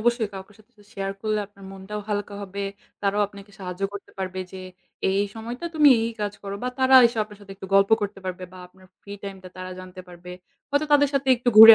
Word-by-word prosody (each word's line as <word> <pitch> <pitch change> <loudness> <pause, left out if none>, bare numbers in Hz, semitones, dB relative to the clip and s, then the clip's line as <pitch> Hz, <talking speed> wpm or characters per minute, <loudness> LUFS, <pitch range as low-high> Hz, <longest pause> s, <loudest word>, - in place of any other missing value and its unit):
অবশ্যই 235 -1 +2
কাওকে 190 +1 -9
সাথে 215 +3 -23
তো - - -17
share 195 0 -3
করলে 215 -1 0
আপনার 200 -1 -16
মনটাও 195 +2 -6
হালকা 205 -1 -2
হবে, 200 +1 -6 0.4
তারাও 200 +1 +2
আপনাকে 200 0 -13
সাহায্য 180 +1 -6
করতে 200 - -8
পারবে। 185 0 -3
যে - - -7 0.5
এই, 190 - +2
এই - - -1
সময়টা 240 +7 -6
তুমি 300 -2 +7
এই, - - 0
এই 230 - -3
কাজ 205 -1 -1
করো। 200 0 -4
বা 250 - 0
তারা 260 0 +5
এসে 230 -1 -4
আপনার 210 -1 -14
সাথে 195 -1 -10
একটু 190 - -8
গল্প 195 +2 +5
করতে 200 -1 -3
পারবে 185 0 -4
বা - - -11
আপনার 185 +1 -20
free 200 0 -8
time 195 -1 -6
টা 185 - -7
তারা 185 0 -6
জানতে 185 0 -10
পারবে। 180 0 -11 0.4
হয়তো 285 +2 +2
তাদের 290 -1 +6
সাথে 270 -1 +1
একটু 245 +1 -1
ঘুরে 225 0 +14
200 Hz, 235 wpm, -25 LUFS, 190-225 Hz, 0.5 s, ঘুরে